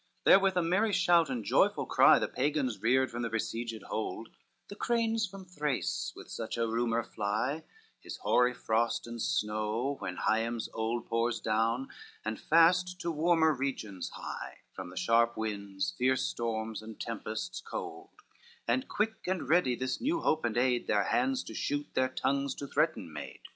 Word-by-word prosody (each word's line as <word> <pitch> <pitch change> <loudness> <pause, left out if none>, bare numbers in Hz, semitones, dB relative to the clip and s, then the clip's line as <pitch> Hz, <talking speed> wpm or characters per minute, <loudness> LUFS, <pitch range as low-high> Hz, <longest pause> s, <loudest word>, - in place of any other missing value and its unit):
II - - +7
Therewith 195 -1 +5
a 180 - +3
merry 195 +6 +2
shout 175 -4 +4
and 125 -4 -2
joyful - - +3
cry - - +6
The - - 0
Pagans 130 -6 -1
reared 130 +3 +3
from 120 - -4
their 115 - -1
besieged 115 0 -3
hold; 110 +1 -4 0.4
The 200 - -9
cranes 225 -1 +1
from 195 0 -10
Thrace 150 -6 -2
with - - -11
such - - -5
a 115 0 +1
rumor 115 0 0
fly, 110 +11 -2 0.4
His - - -8
hoary 125 0 +3
frost 115 +1 0
and 120 -1 -6
snow 110 +7 -1
when 95 -2 -4
Hyems 115 +1 0
old 115 +1 -2
Pours 115 0 0
down, 115 +4 0 0.4
and 110 0 -3
fast 180 +3 +4
to 170 - -1
warmer 160 0 +3
regions 125 -9 -3
hie, - - -7
From 95 -2 -7
the 90 - -11
sharp 115 +1 +3
winds, 100 -4 -3
fierce 130 +1 +2
storms 110 -2 -3
and 110 0 -10
tempests 110 -1 -4
cold; - - -6 0.6
And 125 +2 +1
quick, 220 -1 -2
and 185 -1 -1
ready 155 -7 +3
this 130 +1 -3
new 325 +6 0
hope 155 -4 +1
and 120 -1 -1
aid, 125 -1 +2
Their 105 -1 +3
hands 130 +6 +1
to - - -9
shoot, 145 +5 -2
their 130 0 +2
tongues 140 +1 -1
to 140 - -6
threaten 135 - 0
made. 75 - -8
120 Hz, 170 wpm, -31 LUFS, 110-155 Hz, 0.6 s, II